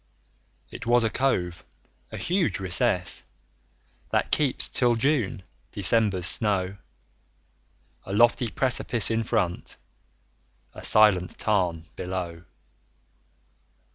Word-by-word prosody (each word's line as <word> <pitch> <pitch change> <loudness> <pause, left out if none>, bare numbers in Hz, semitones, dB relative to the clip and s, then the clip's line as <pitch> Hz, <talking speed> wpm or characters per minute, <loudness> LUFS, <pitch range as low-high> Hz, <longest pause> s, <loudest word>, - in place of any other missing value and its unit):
It - - -9
was 120 0 +4
a 110 - 0
cove, 90 -11 -1 0.5
a - - -6
huge 180 - -1
recess, 95 0 0 0.9
That - - -1
keeps, 145 -4 +2
till 120 -2 +2
June, 125 -4 0 0.3
December's 100 -2 +1
snow; 95 0 -1 1.3
A - - -6
lofty 120 +3 +3
precipice 120 -3 +1
in 115 0 0
front, 90 -5 -2 1.0
A - - -11
silent 105 -5 +4
tarn 90 -6 0
[A] 80 - -32
below! 90 -2 -5
105 Hz, 100 wpm, -25 LUFS, 90-120 Hz, 1.3 s, was